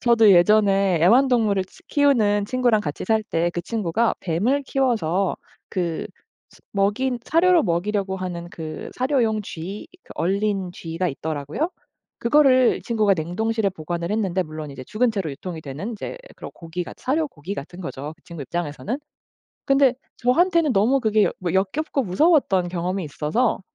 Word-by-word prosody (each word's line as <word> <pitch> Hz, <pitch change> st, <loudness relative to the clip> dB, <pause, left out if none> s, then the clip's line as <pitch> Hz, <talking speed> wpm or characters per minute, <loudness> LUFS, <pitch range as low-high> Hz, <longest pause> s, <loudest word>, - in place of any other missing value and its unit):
저도 230 Hz, -3 st, +5 dB
예전에 195 Hz, 0 st, +4 dB
애완동물을 225 Hz, -1 st, +4 dB
치 -, -, -20 dB
키우는 220 Hz, -8 st, +3 dB
친구랑 245 Hz, -2 st, +2 dB
같이 145 Hz, -7 st, -4 dB
살 220 Hz, +2 st, +2 dB
때 170 Hz, -5 st, -1 dB
그 175 Hz, -, -2 dB
친구가 220 Hz, +2 st, 0 dB
뱀을 210 Hz, -, 0 dB
키워서 205 Hz, -10 st, 0 dB, 0.3 s
그 175 Hz, -4 st, -2 dB, 0.4 s
스 -, -, -20 dB
먹인 210 Hz, +6 st, +1 dB
사료로 335 Hz, +2 st, +4 dB
먹이려고 190 Hz, +3 st, -1 dB
하는 180 Hz, -2 st, -5 dB
그 160 Hz, -2 st, -7 dB
사료용 250 Hz, -5 st, +1 dB
쥐 195 Hz, -, -7 dB, 0.2 s
그 -, -, -26 dB
얼린 195 Hz, +1 st, 0 dB
쥐가 170 Hz, +1 st, -3 dB
있더라고요. 150 Hz, -, -3 dB, 0.5 s
그거를 255 Hz, -1 st, +5 dB
이 -, -, -10 dB
친구가 215 Hz, -4 st, +2 dB
냉동실에 200 Hz, +6 st, -1 dB
보관을 170 Hz, 0 st, -4 dB
했는데 190 Hz, -4 st, 0 dB
물론 155 Hz, -1 st, -7 dB
이제 130 Hz, -2 st, -9 dB
죽은 235 Hz, -, +1 dB
채로 195 Hz, -8 st, -3 dB
유통이 165 Hz, +4 st, -7 dB
되는 150 Hz, -, -5 dB
이제 220 Hz, -, -6 dB, 0.2 s
그런 -, -, -8 dB
고기같 170 Hz, +1 st, -6 dB
사료 310 Hz, +5 st, 0 dB
고기 175 Hz, -, -7 dB
같은 175 Hz, +2 st, -8 dB
거죠 150 Hz, -3 st, -6 dB
그 165 Hz, -, -33 dB
친구 170 Hz, -4 st, -8 dB
입장에서는. 175 Hz, -, -4 dB, 0.7 s
근데 275 Hz, -2 st, +4 dB, 0.2 s
저한테는 330 Hz, +4 st, +3 dB
너무 230 Hz, +6 st, +3 dB
그게 215 Hz, -3 st, +3 dB
어 -, -, 0 dB
뭐 175 Hz, -3 st, -2 dB
역겹고 275 Hz, +10 st, 0 dB
무서웠던 195 Hz, -, +3 dB
경험이 180 Hz, +2 st, -2 dB
있어서 155 Hz, -, 0 dB
200 Hz, 345 characters per minute, -23 LUFS, 170-240 Hz, 0.7 s, 저도